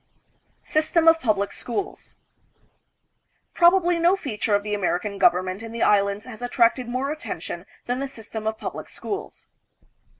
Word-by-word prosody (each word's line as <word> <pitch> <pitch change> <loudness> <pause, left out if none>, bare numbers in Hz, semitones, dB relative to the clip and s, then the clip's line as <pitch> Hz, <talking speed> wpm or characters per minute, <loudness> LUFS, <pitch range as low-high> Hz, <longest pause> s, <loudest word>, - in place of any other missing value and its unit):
System, 315 +2 +2
of 325 0 +7
Publio 205 -7 +1
Schools. 310 +11 -5 1.4
Probably 350 0 +4
no 345 +3 +4
feature 220 - -1
of 205 - 0
tfie 210 0 -3
American 200 +1 -1
government 185 +3 +2
in 225 0 -8
the 230 - -1
Islands 200 0 +2
has 245 -2 -10
attracted 245 0 +2
more 260 +3 -1
attention 310 +2 -6 0.2
than 245 +1 -1
the 275 - -2
system 220 -3 -7
of 220 0 -1
public - - -6
schools. 400 0 -6
235 Hz, 140 wpm, -24 LUFS, 210-315 Hz, 1.4 s, of